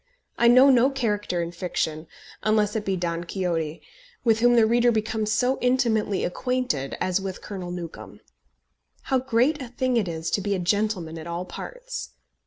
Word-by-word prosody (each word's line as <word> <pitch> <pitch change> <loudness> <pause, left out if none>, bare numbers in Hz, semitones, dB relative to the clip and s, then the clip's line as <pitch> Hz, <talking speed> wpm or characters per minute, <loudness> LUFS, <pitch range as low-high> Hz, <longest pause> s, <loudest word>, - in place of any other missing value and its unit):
I 235 - +3
know 255 +3 +7
no 255 +1 +5
character 210 -9 -1
in 170 - -5
fiction, 165 -2 -3 0.3
unless 215 -1 +2
it 220 - -1
be 195 -2 -1
Don 170 -1 -2
Quixote, 170 -3 -3 0.4
with 225 -2 +3
whom 240 +1 +5
the 230 -2 +6
reader 240 +2 +3
becomes 220 -1 -1
so 250 +4 +1
intimately 235 -6 +1
acquainted 180 - -2
as 185 +1 0
with 190 -1 -6
Colonel 185 -3 -6
Newcombe. 175 -2 -8 0.8
How 265 - +1
great 260 +4 +1
a 255 - -5
thing 250 +1 0
it 210 -5 +1
is 165 -1 -4
to 200 - +1
be 200 0 0
a - - -2
gentleman 180 -3 -1
at 160 - -8
all 170 +1 -4
parts! - - -7
210 Hz, 175 wpm, -25 LUFS, 175-245 Hz, 0.8 s, know